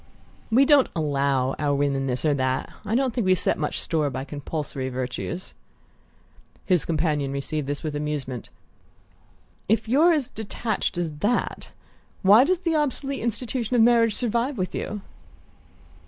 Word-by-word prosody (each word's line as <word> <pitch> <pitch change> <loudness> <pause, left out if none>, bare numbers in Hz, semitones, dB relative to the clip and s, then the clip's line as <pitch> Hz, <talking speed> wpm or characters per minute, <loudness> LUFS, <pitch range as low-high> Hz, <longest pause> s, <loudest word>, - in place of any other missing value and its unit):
"We 250 +5 +5
don't 285 -2 +5
'allow' 140 -4 +1
our 145 -1 +1
women 140 -1 0
this 130 +3 -2
or 150 - +4
that; 130 -1 -1
I 220 - -1
don't 260 -1 +1
think 240 - 0
we 185 0 +5
set - - 0
much 150 - -2
store 155 -3 0
by 130 0 -4
the 135 - -13
compulsory 145 -2 -4
virtues." 130 +8 -4 1.1
His 180 -6 +2
companion 150 -4 0
received 140 +1 -3
this 145 0 -3
with 155 -2 -3
amusement. 145 -5 -4 1.2
"If: 225 +1 +2
you're 300 +9 +5
as 295 -6 0
detached 220 -2 -3
as 165 -4 -2
that, 235 +8 -1 0.5
why 210 +7 +7
does 370 +2 +1
the 335 -3 0
obsolete 280 -2 -1
institution 240 +1 -2
of 230 - +6
marriage 230 -2 +4
survive 240 +3 -1
with 185 -1 -2
you?" 210 -1 -4
170 Hz, 155 wpm, -25 LUFS, 140-235 Hz, 1.2 s, why